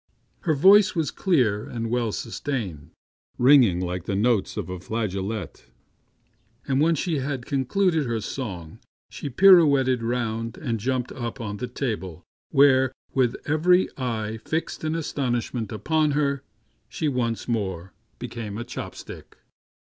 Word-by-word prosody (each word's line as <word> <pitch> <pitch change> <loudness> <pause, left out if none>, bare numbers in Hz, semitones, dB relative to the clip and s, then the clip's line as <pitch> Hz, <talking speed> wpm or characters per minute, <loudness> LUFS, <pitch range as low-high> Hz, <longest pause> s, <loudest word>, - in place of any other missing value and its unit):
Her 160 -4 0
voice 200 +6 +6
was 160 -3 0
clear 125 - +1
and 115 -1 -4
well 120 -2 0
sustained, 110 - -4 0.5
ringing 125 -8 +5
like 90 0 -3
the 100 - -2
notes 110 0 +1
of - - -3
a 90 -1 -6
flageolet, 100 -1 -4 1.0
and 135 0 +1
when 165 +2 +3
she 160 0 -1
had 130 -2 -3
concluded 155 +3 +1
her 115 -1 -1
song 95 - -6 0.3
she 145 - -5
pirouetted 140 -6 +5
round 115 -1 -2
and 120 -7 -3
jumped 125 +2 -1
up 120 0 -5
on 105 -3 -4
the 125 - -4
table, 105 - -4 0.3
where, 130 -3 +5 0.2
with 125 -3 +2
every 180 +5 +3
eye 110 -4 -3
fixed 160 0 -3
in 155 +1 -1
astonishment 120 -7 -2
upon 150 +6 +1
her, 140 -2 0 0.5
she 155 - -2
once 120 -5 -1
more 95 -6 -3 0.2
became 110 -4 -6
a 120 - -4
chop 120 +1 -7
stick. - - -11
125 Hz, 140 wpm, -25 LUFS, 110-145 Hz, 1.0 s, voice